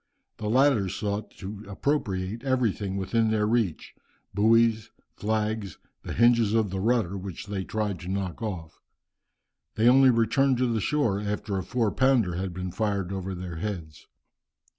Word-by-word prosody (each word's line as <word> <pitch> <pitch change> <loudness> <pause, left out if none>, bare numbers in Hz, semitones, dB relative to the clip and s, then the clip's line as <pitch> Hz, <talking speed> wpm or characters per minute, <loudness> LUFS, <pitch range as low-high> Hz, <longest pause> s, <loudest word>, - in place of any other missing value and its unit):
The 105 -2 -3
latter 125 -5 +3
sought 105 +2 -3
to 105 +1 -7
appropriate 100 -3 -2
everything 110 -7 0
within 110 +4 +1
their 110 -1 +1
reach, 110 -7 -1 0.4
buoys, 110 +2 +3 0.3
flags, 110 -3 -2 0.2
the - - -6
hinges 115 -2 +4
of 110 -4 +1
the 95 - -2
rudder, 110 -3 +1
which 95 -2 -6
they 100 -2 -3
tried 105 -3 -2
to 90 - -9
knock 95 -1 -3
off. 90 -8 -6 0.9
They 110 +2 +3
only 130 +1 +7
returned 125 +3 +3
to 125 - +2
the 110 - 0
shore 115 -6 +1
after 105 0 -3
a - - -4
four 115 +2 0
pounder 130 -9 +2
had 95 +2 -3
been 90 +1 -5
fired 100 -2 -1
over 95 0 -4
their 90 -2 -6
heads. 85 -5 -6
105 Hz, 155 wpm, -27 LUFS, 95-115 Hz, 0.9 s, only